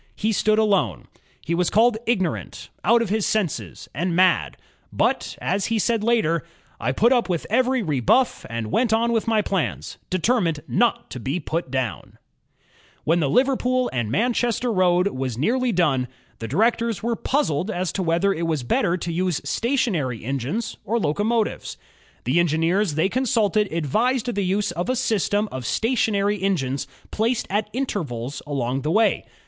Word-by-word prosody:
He 220 +1 0
stood 215 +1 +2
alone. 195 - +1 0.4
He 170 - -1
was 175 +1 +1
called 220 +1 +3
"ignorant," 190 -8 -2
"out 235 +4 +4
of 220 - -5
his 215 +1 0
senses," 155 - -2
and 170 +5 -1
"mad"; 185 0 +3 0.3
but - - 0
as 195 +1 -1
he 230 - 0
said 225 0 +1
later, 215 -9 +2 0.4
"I 125 - 0
put 230 - +3
up 240 -5 +1
with 170 -3 -1
every 255 +1 +2
rebuff 155 - +2
and 115 -2 -4
went 235 -2 +2
on 230 +1 +2
with 225 -1 0
my 220 -2 +2
plans, 190 -5 -3
determined 185 -5 +1
not 235 0 +1
to 125 - -6
be 135 +9 -2
put 165 -1 -3
down," 130 -5 -3 0.9
When 165 +3 +2
the 145 -4 +1
Liverpool 255 - +2
and 120 -4 -1
Manchester 240 - 0
road 180 -1 +3
was 130 - -4
nearly 245 - +1
GEORGE - - -3
STEPHENSON 150 -7 +2
69 125 - -4
done, - - -32
the 115 - -5
directors 225 - +1
were 235 0 0
puzzled 210 - 0
as 185 -3 -2
to 195 - -3
whether 175 +3 +2
it 165 -1 -2
was 155 -5 -1
better 180 - +1
to 170 -1 -4
use 180 -2 0
stationary 190 - 0
engines 140 - -3
or 220 +3 0
locomotives. 210 +7 -1 0.5
The 130 +10 +2
engineers 170 +2 +1
they 160 +4 +2
consulted 215 -3 +1
advised 225 - 0
the 200 - -1
use 195 +2 0
of 175 +7 -3
a 255 - +2
system 210 -3 +1
of 130 -1 -5
stationary 210 -4 +1
engines 140 -10 -1 0.2
placed 225 +2 0
at 210 +1 0
intervals 145 - -3
along 135 -2 -1
the 150 - -2
way. 220 +6 +2
195 Hz, 170 wpm, -23 LUFS, 155-230 Hz, 0.9 s, out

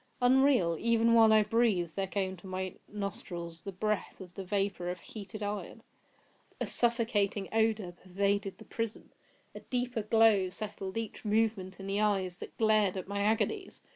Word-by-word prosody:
Unreal!—Even 235 - +4
while 225 -1 +7
I 215 -1 +6
breathed 210 -7 +1
there 195 -1 -1
came 190 -1 -2
to 185 - -12
my 185 0 -3 0.2
nostrils 175 -5 -5
the 195 - -6
breath 215 +2 -2
of 180 -2 -10
the 195 - -6
vapour 195 -2 -1
of 180 0 -4
heated 215 +3 -8
iron! 205 0 -5 0.8
A - - 0
suffocating 225 -5 +1
odour 220 -4 +1
pervaded 195 +3 -1
the - - -13
prison! 225 -1 -5 0.4
A - - -8
deeper 245 -2 -2
glow 215 -3 +4
settled 200 0 -5
each 225 -1 -5
moment 210 -4 0
in 195 - -7
the 200 +1 0
eyes 195 -4 0
that - - -9
glared 215 -3 +3
at 185 - -5
my 200 0 -2
agonies! 225 - 0
205 Hz, 160 wpm, -31 LUFS, 190-225 Hz, 0.8 s, while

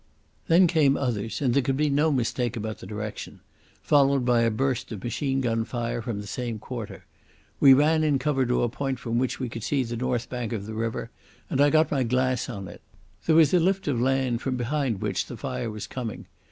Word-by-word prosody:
Then 170 +3 +6
came 155 -5 +3
others, 115 -4 -2
and 125 -3 +2
there 140 - +4
could 135 0 -1
be 150 +1 +2
no 150 +3 +3
mistake 120 -2 -1
about 110 0 -4
the - - -10
direction—followed 130 +5 -1
by 120 -1 +3
a 115 - +3
burst 125 +2 -1
of 105 -4 -6
machine 135 +3 -1
gun 115 -2 0
fire 120 0 -3
from 115 -2 -4
the - - -9
same 120 +1 -4
quarter. 115 0 -7 0.5
We 135 -2 +8
ran 155 +3 +3
in 150 -3 +3
cover 135 -2 0
to 125 - +1
a - - +2
point 135 +2 -3
from 120 0 -2
which 130 0 -1
we 130 - -2
could 115 0 -7
see 140 +1 +1
the 120 -1 -5
north 125 0 -1
bank 120 -2 -4
of 100 -3 -4
the 110 - -6
river, 115 +1 -3 0.4
and 135 - +2
I 145 - +6
got 155 +1 +3
my 140 -3 +1
glass 130 +1 0
on 100 -5 -6
it. 85 - -11 0.5
There 160 - +4
was 160 -1 +5
a 180 - +6
lift 190 +2 +1
of 125 -5 0
land 130 -2 +1
from 130 -2 -2
behind 125 -3 -1
which - - -1
the - - -8
fire 115 - -4
was 105 -1 -6
coming. 120 -3 -6
125 Hz, 220 wpm, -26 LUFS, 115-140 Hz, 0.5 s, We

